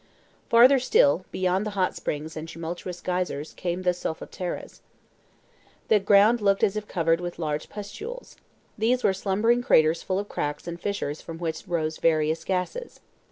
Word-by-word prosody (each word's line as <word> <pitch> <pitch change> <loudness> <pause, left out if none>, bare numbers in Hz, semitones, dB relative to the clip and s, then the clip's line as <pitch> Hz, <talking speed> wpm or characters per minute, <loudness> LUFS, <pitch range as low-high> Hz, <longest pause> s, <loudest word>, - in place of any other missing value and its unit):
Farther 250 +4 +7
still, 180 - +3
beyond 185 +1 0
the 215 - -3
hot 185 -1 +1
springs 155 +2 -4
and 155 +1 -6
tumultuous 170 +2 -6
geysers, 180 -5 -2
came 180 +1 -3
the 180 -1 +3
solfataras. 175 +1 -5 1.1
The 215 - +5
ground 205 +4 +5
looked 200 -1 +2
as 200 - +3
if 210 0 -4
covered 165 -1 +1
with 175 0 -5
large 150 -2 -3
pustules. 425 - -8 0.4
These 245 +3 +2
were 195 - +4
slumbering 210 +5 +1
craters 160 - +4
full 185 - -2
of 205 +1 -3
cracks 145 -3 -4
and 170 0 -6
fissures 200 -7 -3
from 165 - -8
which 165 +3 -4
rose 160 -3 -1
various 160 0 +2
gases. 190 - -3
180 Hz, 160 wpm, -26 LUFS, 165-205 Hz, 1.1 s, Farther